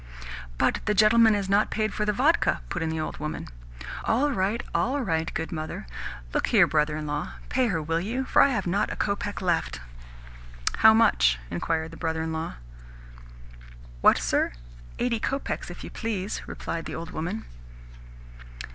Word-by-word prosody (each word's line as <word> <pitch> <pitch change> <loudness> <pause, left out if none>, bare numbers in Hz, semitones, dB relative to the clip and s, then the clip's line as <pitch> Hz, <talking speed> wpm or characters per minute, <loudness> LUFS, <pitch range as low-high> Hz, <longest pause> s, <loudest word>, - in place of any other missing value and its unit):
"But - - +2
the 210 - +1
gentleman 220 +1 +6
has 200 -2 -1
not 200 +2 +3
paid 215 -1 -1
for 210 - -1
the 210 - +2
vodka?" 280 +11 +2
put 175 - -3
in 165 - 0
the 160 0 -2
old 155 - -3
woman. 150 0 -5 0.5
"All 275 +6 +2
right, 205 0 0
all 265 +5 +1
right, 165 -8 -1
good 160 - -4
mother. 155 - -5 0.5
Look - - +1
here, - - +6
brother 150 0 +1
in 155 - -4
law. 150 0 -3 0.2
Pay 255 -1 +2
her, 175 -7 0
will 165 +2 0
you, 235 +8 -2
for - - +5
I - - +7
have 220 -8 -1
not 195 +4 0
a - - -3
kopeck 200 0 -2
left." 170 - 0 1.0
"How 220 0 +8
much?" 205 - +4
inquired 160 - -1
the 165 - -10
brother 160 -1 -1
in 160 0 -3
law. 160 0 -4 1.5
"What, - - +6
sir? - - +1 0.4
Eighty 240 -2 0
kopecks, 275 +5 -2
if - - -9
you - - -8
please," 210 -4 -3
replied 165 -1 -4
the - - -5
old 165 - -6
woman. 180 +8 -4
190 Hz, 175 wpm, -26 LUFS, 160-220 Hz, 1.5 s, How